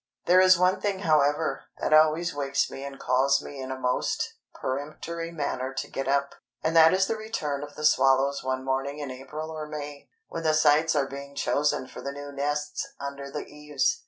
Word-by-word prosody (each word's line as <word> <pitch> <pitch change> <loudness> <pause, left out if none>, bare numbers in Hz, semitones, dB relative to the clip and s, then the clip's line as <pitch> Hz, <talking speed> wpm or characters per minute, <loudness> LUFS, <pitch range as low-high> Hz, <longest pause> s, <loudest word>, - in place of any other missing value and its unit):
There 185 +1 +6
is 185 -1 +7
one 180 +1 +2
thing, 200 -2 -1
however, 150 -3 +2
that - - 0
always 155 +3 +4
wakes 140 -1 0
me 135 - -7
and 140 -1 -7
calls 135 +2 +3
me 140 -1 -8
in 130 - -6
a 130 - -4
most 125 -1 -1 0.3
peremptory 155 +5 -4
manner 135 -4 -3
to - - -3
get 135 -1 -3
up, 140 0 +1 0.3
and 160 +1 0
that 160 0 +8
is 190 +1 +3
the 225 - -1
return 155 -10 -3
of 145 0 -8
the 150 - -3
swallows 135 0 +3
one 130 0 -2
morning 135 +2 -1
in 145 -3 -5
April 150 +5 -7
or 155 -1 -5
May, 145 -1 -7 0.2
when 165 - -5
the 155 -1 +2
sites 155 +1 +4
are 140 -2 +2
being 140 +1 -9
chosen 140 -1 +1
for - - -10
the 140 - -4
new 145 +1 -8
nests 145 +1 -2 0.2
under 140 0 -6
the 150 - -5
eaves. 150 - -1
145 Hz, 200 wpm, -27 LUFS, 140-155 Hz, 0.3 s, that